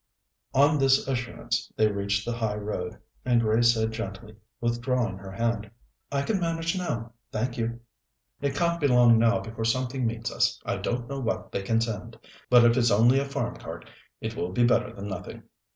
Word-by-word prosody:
On 145 Hz, +2 st, +5 dB
this 135 Hz, 0 st, +4 dB
assurance 125 Hz, -3 st, -2 dB
they 110 Hz, -, +4 dB
reached 100 Hz, 0 st, -1 dB
the 120 Hz, -, -2 dB
high 110 Hz, -3 st, -1 dB
road, 105 Hz, -4 st, -4 dB, 0.3 s
and 120 Hz, -2 st, +3 dB
Grace 115 Hz, +1 st, +4 dB
said 110 Hz, 0 st, 0 dB
gently, 110 Hz, -1 st, -6 dB, 0.2 s
withdrawing 120 Hz, -3 st, -1 dB
her 95 Hz, 0 st, -9 dB
hand: 110 Hz, 0 st, -1 dB, 0.4 s
"I 140 Hz, 0 st, 0 dB
can 200 Hz, +5 st, 0 dB
manage 165 Hz, 0 st, -1 dB
now, 120 Hz, -11 st, -3 dB, 0.2 s
thank 120 Hz, +3 st, -2 dB
you." 115 Hz, 0 st, -2 dB, 0.6 s
"It 140 Hz, -1 st, -1 dB
can't 170 Hz, +1 st, +1 dB
be 145 Hz, -, +4 dB
long 120 Hz, -3 st, +6 dB
now 115 Hz, 0 st, +3 dB
before 115 Hz, 0 st, -6 dB
something 130 Hz, +1 st, 0 dB
meets 115 Hz, +1 st, -3 dB
us. -, -, +1 dB
I -, -, -1 dB
don't 120 Hz, 0 st, -2 dB
know 140 Hz, +1 st, -4 dB
what 115 Hz, -3 st, -3 dB
they -, -, -2 dB
can 115 Hz, +3 st, +1 dB
send; 115 Hz, -4 st, -4 dB, 0.3 s
but 120 Hz, -1 st, +7 dB
if 115 Hz, 0 st, +5 dB
it's 120 Hz, -2 st, +4 dB
only 120 Hz, +6 st, +5 dB
a 140 Hz, -, -1 dB
farm 135 Hz, -3 st, -3 dB
cart, -, -, -8 dB, 0.3 s
it -, -, -4 dB
will 90 Hz, -, -3 dB
be 120 Hz, +6 st, +2 dB
better 120 Hz, 0 st, +3 dB
than 100 Hz, -2 st, -7 dB
nothing." 95 Hz, -, -7 dB
120 Hz, 190 wpm, -27 LUFS, 110-130 Hz, 0.6 s, but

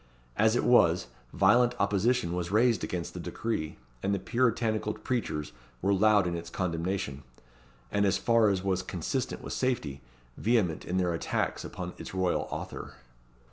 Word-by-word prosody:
As 110 Hz, +2 st, +3 dB
it -, -, +1 dB
was, 90 Hz, -8 st, +4 dB, 0.3 s
violent 120 Hz, +6 st, +4 dB
opposition 100 Hz, -1 st, +1 dB
was 90 Hz, -1 st, -2 dB
raised 115 Hz, +1 st, +3 dB
against 85 Hz, -2 st, -3 dB
the -, -, -6 dB
decree, 80 Hz, -9 st, -3 dB, 0.2 s
and 100 Hz, +1 st, +1 dB
the -, -, -2 dB
Puritanical 115 Hz, -1 st, 0 dB
preachers 95 Hz, -, -3 dB, 0.3 s
wore 100 Hz, +9 st, +2 dB
loud 105 Hz, 0 st, +4 dB
in 85 Hz, -1 st, -1 dB
its 85 Hz, 0 st, -6 dB
condemnation, 85 Hz, -5 st, -2 dB, 0.7 s
and 100 Hz, -, +2 dB
as 100 Hz, -, +3 dB
far 115 Hz, -2 st, +4 dB
as 95 Hz, -2 st, 0 dB
was 95 Hz, -1 st, 0 dB
consistent 95 Hz, -, -3 dB
with -, -, -5 dB
safety, 80 Hz, -, -1 dB, 0.4 s
vehement 105 Hz, -8 st, +1 dB
in 90 Hz, -, -1 dB
their 90 Hz, -2 st, +1 dB
attacks 85 Hz, -, -2 dB
upon -, -, -6 dB
its -, -, -7 dB
royal 95 Hz, -1 st, 0 dB
author. -, -, -6 dB
100 Hz, 155 wpm, -29 LUFS, 90-115 Hz, 0.7 s, was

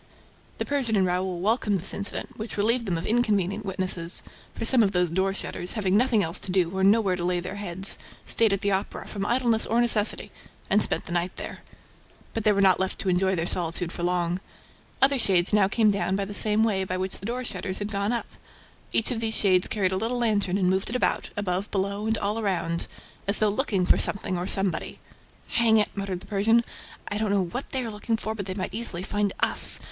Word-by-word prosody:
The -, -, -3 dB
Persian 265 Hz, -6 st, -1 dB
and 190 Hz, -2 st, +3 dB
Raoul 180 Hz, 0 st, -2 dB
welcomed 210 Hz, -1 st, +1 dB
this 180 Hz, -, -5 dB
incident, 200 Hz, 0 st, -3 dB
which 220 Hz, 0 st, -7 dB
relieved 230 Hz, +3 st, +1 dB
them 175 Hz, -3 st, -1 dB
of 165 Hz, -, -5 dB
inconvenient 215 Hz, -3 st, 0 dB
witnesses, 185 Hz, -3 st, -1 dB, 0.3 s
for 225 Hz, -, -4 dB
some 250 Hz, +1 st, +7 dB
of 200 Hz, -2 st, +2 dB
those 180 Hz, -2 st, +1 dB
door 190 Hz, +2 st, +1 dB
shutters, 185 Hz, -2 st, -1 dB
having 195 Hz, -4 st, 0 dB
nothing 230 Hz, -2 st, +3 dB
else 165 Hz, +3 st, -1 dB
to 185 Hz, -, -6 dB
do 180 Hz, -1 st, 0 dB
or 190 Hz, -, 0 dB
nowhere 200 Hz, -1 st, +3 dB
to 175 Hz, -, -4 dB
lay 180 Hz, 0 st, +1 dB
their 185 Hz, +3 st, -6 dB
heads, 190 Hz, -1 st, +1 dB, 0.3 s
stayed 225 Hz, -2 st, +2 dB
at 195 Hz, 0 st, -1 dB
the 200 Hz, -, 0 dB
Opera, 195 Hz, +1 st, -3 dB
from 200 Hz, -1 st, -4 dB
idleness 240 Hz, -3 st, +1 dB
or 230 Hz, -, +1 dB
necessity, 230 Hz, -3 st, +2 dB, 0.4 s
and 210 Hz, +2 st, +4 dB
spent -, -, +5 dB
the -, -, -8 dB
night 175 Hz, +1 st, -2 dB
there. -, -, -7 dB, 0.7 s
But 225 Hz, -, -3 dB
they 215 Hz, -, +5 dB
were 200 Hz, -1 st, +2 dB
not 190 Hz, -2 st, +4 dB
left 190 Hz, 0 st, -1 dB
to 190 Hz, -, -1 dB
enjoy 190 Hz, +1 st, +1 dB
their 165 Hz, -1 st, -1 dB
solitude 175 Hz, 0 st, 0 dB
for 175 Hz, -, -7 dB
long. 175 Hz, 0 st, 0 dB, 0.6 s
Other 275 Hz, 0 st, +4 dB
shades 190 Hz, -4 st, +3 dB
now 205 Hz, -2 st, +4 dB
came 215 Hz, +1 st, +2 dB
down 195 Hz, -1 st, -1 dB
by 200 Hz, 0 st, -1 dB
the 205 Hz, -, -7 dB
same 215 Hz, +1 st, +3 dB
way 200 Hz, -4 st, +1 dB
by 185 Hz, -1 st, -3 dB
which 190 Hz, +1 st, -3 dB
the 195 Hz, -, -6 dB
door 250 Hz, +2 st, -3 dB
shutters 190 Hz, -5 st, -3 dB
had 205 Hz, +1 st, -4 dB
gone 200 Hz, +1 st, -1 dB
up. 240 Hz, -, -2 dB, 0.7 s
Each 225 Hz, -, +1 dB
of 235 Hz, -, -2 dB
these 220 Hz, -1 st, -1 dB
shades 185 Hz, -3 st, +3 dB
carried 195 Hz, -3 st, 0 dB
a 190 Hz, -, -1 dB
little 230 Hz, +5 st, -2 dB
lantern 205 Hz, -5 st, +1 dB
and 185 Hz, -2 st, +1 dB
moved 190 Hz, +1 st, 0 dB
it 235 Hz, -, -4 dB
about, 250 Hz, -, 0 dB
above, 195 Hz, 0 st, -2 dB
below 200 Hz, +2 st, -2 dB
and 220 Hz, 0 st, 0 dB
all 205 Hz, +2 st, -1 dB
around, 170 Hz, -5 st, -1 dB, 0.4 s
as 200 Hz, -, +4 dB
though 215 Hz, -, +3 dB
looking 205 Hz, -4 st, 0 dB
for -, -, +3 dB
something 190 Hz, -2 st, +2 dB
or 175 Hz, +1 st, -3 dB
somebody. 195 Hz, -4 st, +1 dB, 0.5 s
"Hang 225 Hz, -1 st, +3 dB
it!" 210 Hz, -, +3 dB
muttered 195 Hz, -3 st, -4 dB
the -, -, -12 dB
Persian. 225 Hz, +3 st, +2 dB, 0.4 s
"I 205 Hz, -, -3 dB
don't 215 Hz, -1 st, -1 dB
know 200 Hz, -1 st, +2 dB
what 245 Hz, +10 st, -6 dB
they 260 Hz, -2 st, -3 dB
are 225 Hz, -, -5 dB
looking 220 Hz, +2 st, -2 dB
for, 220 Hz, 0 st, -4 dB
but 200 Hz, -3 st, -6 dB
they 185 Hz, -, -4 dB
might 185 Hz, -1 st, -4 dB
easily 205 Hz, -5 st, -3 dB
find 205 Hz, 0 st, -1 dB
us -, -, +4 dB
200 Hz, 230 wpm, -25 LUFS, 185-220 Hz, 0.7 s, some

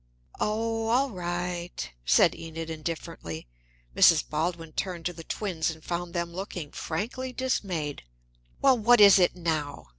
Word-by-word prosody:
"Oh, 225 Hz, +1 st, -1 dB
all 255 Hz, +4 st, +2 dB
right," 175 Hz, -, -4 dB, 0.2 s
said -, -, +5 dB
Enid 165 Hz, 0 st, -6 dB
indifferently. 155 Hz, -, -6 dB, 0.5 s
Mrs. 165 Hz, -3 st, +6 dB
Baldwin 165 Hz, +1 st, -2 dB
turned 180 Hz, -3 st, -3 dB
to 180 Hz, -, -1 dB
the 165 Hz, -1 st, -10 dB
twins, 170 Hz, -4 st, -2 dB
and 160 Hz, -1 st, -7 dB
found 175 Hz, 0 st, -4 dB
them 170 Hz, 0 st, -2 dB
looking 175 Hz, -5 st, -6 dB
frankly 240 Hz, +10 st, -4 dB
dismayed. 185 Hz, -, -2 dB, 0.6 s
"Well, 265 Hz, -3 st, +5 dB
what 240 Hz, +2 st, +5 dB
is 200 Hz, -2 st, +9 dB
it 180 Hz, -, +3 dB
now?" 150 Hz, -, -3 dB
175 Hz, 140 wpm, -27 LUFS, 160-205 Hz, 0.6 s, is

